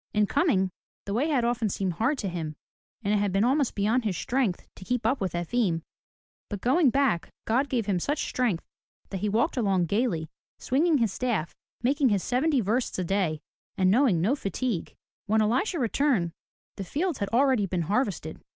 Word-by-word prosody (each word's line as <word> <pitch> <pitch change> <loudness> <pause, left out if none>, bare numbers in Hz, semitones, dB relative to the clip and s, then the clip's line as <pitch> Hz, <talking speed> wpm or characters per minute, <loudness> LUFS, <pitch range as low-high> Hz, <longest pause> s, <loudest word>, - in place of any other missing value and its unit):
In 210 0 +4
coming, 205 - +2 0.3
the 200 - -3
way 255 +8 +1
had 270 -7 +1
often 235 -2 0
seemed 190 -1 -1
hard 230 - 0
to 210 - -3
him, 165 -4 -4 0.5
and 205 0 +1
it - - +3
had 200 -1 +1
been 195 +2 +2
almost 270 +2 +2
beyond 220 +5 +1
his 200 -6 -1
strength 245 -8 -1
to - - -10
keep 245 +3 -2
up 255 +2 +1
with 185 -3 -1
Efim, 175 -1 0 0.7
but 205 - -4
going 270 - +3
back 265 -10 +1 0.2
God 260 +5 +1
gave 235 -5 0
him 195 -3 0
such 290 - -1
strength 235 -10 -1 0.5
that 195 - -3
he 210 - -1
walked 235 - +1
along 195 -6 +2
gaily, 195 -4 0 0.3
swinging 305 +4 +2
his 225 -6 +1
staff, 200 -12 -1 0.3
making 275 +1 +3
his 200 -4 +1
seventy 270 +2 +2
versts 230 +5 -1
a 185 - -1
day, 175 -4 0 0.4
and 185 -1 +4
knowing 230 -6 +4
no 210 +11 +2
fatigue. 215 - -3 0.3
When 220 +2 +3
Elisha 250 - +1
returned, 245 - +1 0.5
the 195 - -3
fields 310 - -2
had 200 -2 -2
already 250 -4 +3
been 175 -2 -1
harvested. 195 - -2
220 Hz, 190 wpm, -27 LUFS, 190-260 Hz, 0.7 s, In